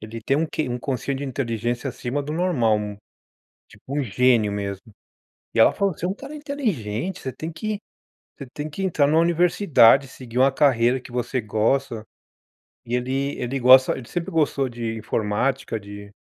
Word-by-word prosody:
ele 110 +1 -8
tem 135 +5 0
um 160 +2 +1
QI, 155 -2 -3
um 120 0 -3
quociente 135 +1 -3
de 140 - -4
inteligência 120 0 -2
acima 130 +3 -3
do 145 +2 -5
normal, 155 -11 +2
um 105 -1 -4 0.7
tipo - - -20
um - - +1
gênio 115 -1 +2
mesmo. 100 +1 -5 0.6
E - - -2
ela 110 - +7
falou: 200 -1 +1
"Você 170 - -4
é - - -1
um 190 - -2
cara 280 +7 -10
inteligente, 190 - -3
você 130 - -5
tem 160 +5 -6
que 210 +6 -3 0.6
você 140 - -7
tem 150 +1 -4
que 175 +6 -5
entrar 160 -6 +2
numa 155 +3 +3
universidade, 165 - +4
seguir 125 -2 -7
uma 135 +2 +5
carreira 130 -3 +3
que 125 - -13
você 125 +1 -2
gosta". 110 +3 0 0.8
E 120 - -2
ele 135 +3 -2
ele 130 +2 -2
gosta 130 +1 +6
ele 120 - -9
sempre 175 -2 -4
gostou 145 -4 +1
de 115 -1 -4
informática, 115 +4 -1
de 100 0 -10
130 Hz, 180 wpm, -23 LUFS, 115-150 Hz, 0.8 s, ela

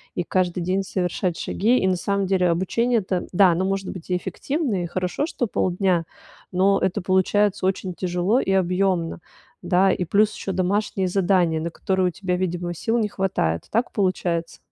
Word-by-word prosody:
и 175 - -1
каждый 180 0 0
день 185 +3 0
совершать 180 -2 -2
шаги. 235 +6 +1
И 190 - +1
на 185 - +2
самом 200 +2 -1
деле 185 -2 +2
обучение 230 +8 +1
это 185 -3 -3
да, 190 0 +5
оно 175 +3 0
может 195 0 -2
быть 185 -2 -10
и 180 - +1
эффективное, 260 - -2
и - - -4
хорошо, 180 - -2
что 255 - -2
полдня, 185 -3 0 0.5
но 195 +2 +3
это 190 +2 0
получается 190 +2 +2
очень 190 -1 -2
тяжело 180 +6 +1
и 195 - -1
объемно, 185 -2 +1 0.4
да. 185 +2 +3
И 180 - -1
плюс 205 +5 +3
ещё 195 - -4
домашние 190 +1 0
задания, 180 -3 +2
на 170 - -2
которые 190 +2 0
у - - -1
тебя, 180 0 -2
видимо, 175 -1 -2
сил 225 +7 -1
не 215 -3 0
хватает. 85 - -1
Так 230 +3 0
получается? 175 -4 -1
185 Hz, 180 wpm, -23 LUFS, 180-195 Hz, 0.5 s, да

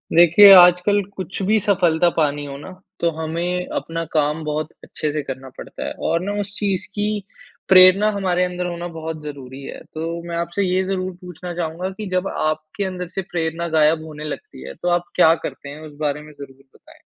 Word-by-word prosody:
देखिए, 175 +4 +8
आजकल 180 +3 +6
कुछ 190 +1 -5
भी 215 +3 +3
सफलता 175 -4 +2
पानी 145 -2 0
हो 140 -1 -7
ना, 145 - -10 0.3
तो 170 - +2
हमें 175 +3 -2
अपना 165 0 -3
काम 150 +1 +1
बहुत 155 +1 -2
अच्छे 150 - -4
से 150 0 -2
करना 135 0 -7
पड़ता - - -8
है - - -3 0.2
और 165 - +2
ना 200 +2 -2
उस 205 0 -7
चीज़ 195 -3 -1
की, 210 0 -2 0.5
प्रेरणा 185 +3 +7
हमारे 185 -3 0
अंदर 180 0 -4
होना 175 0 -4
बहुत 160 -2 -6
ज़रूरी 140 -2 -8
है। - - -8
तो 165 +2 -4
मैं 170 - -4
आपसे 170 +4 -1
ये 185 0 +1
ज़रूर 185 -1 -2
पूछना 180 0 -8
चाहूँगा 170 +2 -3
कि 215 - -5
जब 185 +1 0
आपके 155 +4 -2
अंदर 180 -1 -4
से - - +1
प्रेरणा 165 0 -2
गायब 155 +1 +3
होने 150 -1 -9
लगती 145 - -7
है, 70 - -7
तो 175 - -3
आप 175 0 +2
क्या 165 -2 +6
करते 140 - -6
हैं 150 +2 -9
उस 145 -1 -15
बारे 150 -1 -1
में 150 0 -13
ज़रूर 135 -2 -12
बताएँ? - - -19
170 Hz, 200 wpm, -21 LUFS, 155-185 Hz, 0.5 s, देखिए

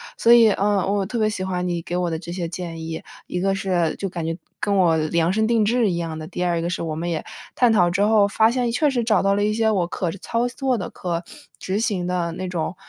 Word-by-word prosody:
所 230 - +3
以， 230 -2 +7
嗯， 205 +1 +1 0.2
我 200 -1 +1
特 235 - -4
别 215 -1 +2
喜 210 -3 -3
欢 180 -1 -2
你 175 -1 -2
给 175 +2 -4
我 175 -1 -1
的 160 - -2
这 170 0 -8
些 175 -1 -3
建 165 -1 -6
议， 160 0 -5 0.2
一 180 - -4
个 195 +1 +1
是 180 -5 0
就 195 - -3
感 170 -2 -5
觉 165 0 -2 0.2
跟 205 -1 0
我 175 -4 +4
量 165 +2 +1
身 220 +1 +1
定 230 -1 +3
制 230 0 +2
一 175 - -1
样 165 -2 -4
的， 155 - -7
第 180 +1 -4
二 170 -2 0
个 170 - -2
是 175 - -3
我 160 -2 -3
们 170 +2 -3
也 165 +1 -3 0.3
探 245 -2 +4
讨 180 -5 +4
之 185 +3 0
后， 210 -1 +4
发 220 +2 +3
现 245 -1 0
确 295 +5 +2
实 250 -3 0
找 215 -4 +3
到 195 0 +3
了 205 - +1
一 210 +1 +1
些 220 0 +2
我 185 -5 +1
可 175 -1 -2
操 230 +6 -2
作 260 0 -1
的、 190 - -4
可 170 -1 -4 0.3
执 190 +2 -2
行 205 -6 -1
的 175 -2 -1
那 185 +2 -5
种， 180 0 -3
185 Hz, 290 characters per minute, -22 LUFS, 170-215 Hz, 0.3 s, 以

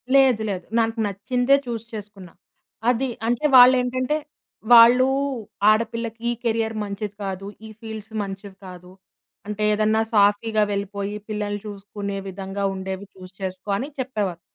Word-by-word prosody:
లేదు, 260 -5 +5
లేదు. 185 -3 -4
నాకు 225 0 0
నచ్చిందే 245 +7 +1
చూజ్ 230 -2 -5
చేసుకున్నా. 200 -4 -9 0.6
అది 250 +2 +1 0.2
అంటే 240 +5 0
వాళ్ళేంటంటే, 255 +3 +5 0.6
వాళ్ళు 240 +2 +8 0.6
"ఆడపిల్లకి 230 +1 0
ఈ - - +2
కెరియర్ 225 -1 0
మంచిది 205 0 -5
కాదు, 195 0 -4 0.2
ఈ - - -10
ఫీల్డ్స్ 220 -1 -8
మంచివి 195 0 -8
కాదు. 180 0 -11 0.6
అంటే 210 0 -3
ఏదన్నా 215 +1 +2
సాఫీగా 210 +1 +3
వెళ్ళిపోయి, 200 +1 -3
పిల్లల్ని 205 -1 -3
చూసుకునే 200 0 -6
విధంగా 195 +1 -5
ఉండేవి 190 +1 -5
చూజ్ 185 0 -13
చేసుకో" 185 +1 -5
అని 275 +6 -4
చెప్పేవారు. 205 -9 -2
210 Hz, 130 wpm, -23 LUFS, 195-230 Hz, 0.6 s, వాళ్ళు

